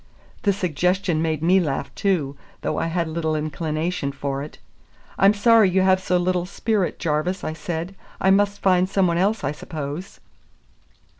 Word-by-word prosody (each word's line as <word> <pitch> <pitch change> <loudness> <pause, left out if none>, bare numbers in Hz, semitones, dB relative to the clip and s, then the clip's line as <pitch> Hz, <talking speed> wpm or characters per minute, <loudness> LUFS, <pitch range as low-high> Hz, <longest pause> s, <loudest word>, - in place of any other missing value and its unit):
The 205 - +3
suggestion 180 -1 0
made 160 -1 -1
me 185 +3 +5
laugh 140 -5 -2
too, 160 -9 0 0.3
though - - -2
I - - -1
had 170 0 -1
little 160 -1 -1
inclination 155 0 -2
for 140 0 -4
it. 150 - -8 0.6
"I'm 195 +2 +5
sorry 220 -1 +5
you 190 +1 +2
have 190 0 +3
so 180 -1 +1
little 180 0 0
spirit, 205 -1 -1
Jarvis," 165 +3 -1
I 155 - -3
said. 165 +3 -5 0.3
"I 190 - +3
must 200 +1 +2
find 185 -1 +3
some 195 -1 +2
one 170 -1 +1
else, 205 +2 +1
I 140 - 0
suppose." 150 +3 -7
175 Hz, 165 wpm, -23 LUFS, 155-190 Hz, 0.6 s, me